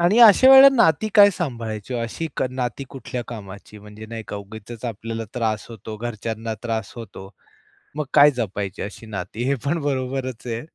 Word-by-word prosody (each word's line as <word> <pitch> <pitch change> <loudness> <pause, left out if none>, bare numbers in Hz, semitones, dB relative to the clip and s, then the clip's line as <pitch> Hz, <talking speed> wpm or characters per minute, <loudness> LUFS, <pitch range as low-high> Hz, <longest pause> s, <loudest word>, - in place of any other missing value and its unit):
आणि 180 +7 +3
अशा 230 +3 +8
वेळेला 270 +1 +10
नाती 165 -1 +3
काय 205 -2 +8
सांभाळायची, 120 - -5
अशी 120 +7 -3
क - - 0
नाती 130 +1 -4
कुठल्या 125 -2 -6
कामाची 105 -2 -10
म्हणजे 105 +1 -12
नाही 115 0 -7
का - - -5
उगीचच 110 +3 -10
आपल्याला 115 0 -5
त्रास 110 -3 -2
होतो, 110 -1 -9
घरच्यांना 115 0 -5
त्रास 115 -3 -3
होतो. 100 -4 -9 0.7
मग 150 - -1
काय 145 0 +8
जपायची 100 -6 -4
अशी 105 +3 -8
नाती 100 +2 -5
हे 140 - +2
पण 160 +4 0
बरोबरच 130 -3 -3
आहे. 115 -1 -3
115 Hz, 170 wpm, -22 LUFS, 110-135 Hz, 0.7 s, वेळेला